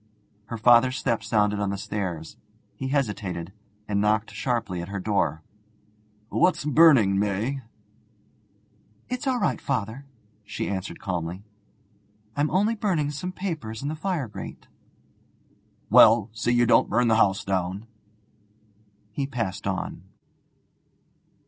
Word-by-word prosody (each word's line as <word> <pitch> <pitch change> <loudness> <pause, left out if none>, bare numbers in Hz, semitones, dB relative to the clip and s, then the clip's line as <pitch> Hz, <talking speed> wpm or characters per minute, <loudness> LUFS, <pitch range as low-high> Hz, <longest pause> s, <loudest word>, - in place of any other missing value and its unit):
Her 115 +2 -6
father's 120 +3 +5
step 115 -2 -1
sounded 105 -1 +1
on 100 -1 0
the 100 - -2
stairs; 95 -6 -4 0.4
he 135 - -5
hesitated, 105 - -2 0.3
and 100 -1 0
knocked 105 +1 +1
sharply 115 -8 -2
at 85 - -6
her 100 0 -4
door. 90 -7 0 0.9
'What's 180 -5 +2
burning, 135 -10 +5
May?' 105 +7 -1 1.5
'It's 250 +3 -3
all 255 -2 +1
right, - - 0
father,' 125 +1 -3 0.4
she - - -4
answered 95 -3 -4
calmly, 90 +1 -4 0.9
'I'm 145 +1 +1
only 205 +5 +2
burning 180 -10 0
some 180 +5 -4
papers 155 - -5
in 140 - -2
the 155 - -3
fire 160 -5 -2
grate.' 105 - -9 1.2
'Well, 110 -1 +7
see 115 +2 -1
you 120 0 +4
don't 120 - +4
burn 120 0 +2
the 110 -1 +4
house 100 -2 +3
down.' 95 +2 -2 1.3
He 135 +6 -3
passed 115 -9 -3
on. - - -3
110 Hz, 125 wpm, -25 LUFS, 100-140 Hz, 1.5 s, Well